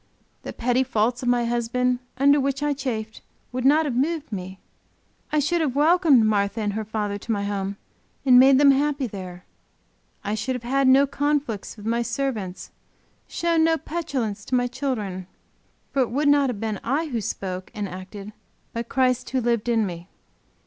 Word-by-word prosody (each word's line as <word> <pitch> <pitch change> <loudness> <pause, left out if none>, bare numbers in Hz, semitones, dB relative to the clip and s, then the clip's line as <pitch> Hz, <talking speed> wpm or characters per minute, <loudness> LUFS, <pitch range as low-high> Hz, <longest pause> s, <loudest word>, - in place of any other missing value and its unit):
The - - -6
petty 245 +2 +1
faults 240 -1 0
of 245 - 0
my 240 -1 +2
husband 240 +1 0 0.2
under 280 +2 +5
which 275 +1 -1
I 295 0 +1
chafed 225 -6 -4 0.3
would 250 0 -3
not 305 +3 +5
have 280 - -1
moved 300 +2 -1
me; 190 -1 -6 0.7
I 305 - +1
should 330 +4 +1
have 280 -5 -1
welcomed 300 -5 +5
Martha 205 0 +1
and 205 -1 -1
her 220 +1 -2
father 210 -1 -3
to 230 - -5
my 200 -2 0
home 200 -1 -3 0.5
and 250 -2 +7
made 265 +1 +7
them 280 0 +7
happy 285 0 +1
there; 185 -5 -8 0.8
I 205 - -2
should 255 +4 -2
have 250 - -6
had 270 +2 +1
no 270 +2 +6
conflicts 280 -7 -2
with 205 - -11
my 230 +1 +1
servants, 235 -6 -3 0.6
shown 335 -1 +1
no 325 0 +3
petulance 265 -12 -3
to 255 - -1
my 245 0 +2
children. 215 -9 -3 0.6
For 275 - +1
it 250 - +1
would 290 +5 0
not 285 -2 +4
have 225 -5 -4
been 220 -2 -3
I 285 +7 0
who 235 -4 -2
spoke 185 -2 -5
and 205 -1 -3
acted 195 +3 -9 0.4
but 230 0 -4
Christ 255 -1 +1
who 260 - 0
lived 235 -1 0
in 225 -2 +2
me. 175 0 -7
245 Hz, 185 wpm, -24 LUFS, 210-275 Hz, 0.8 s, and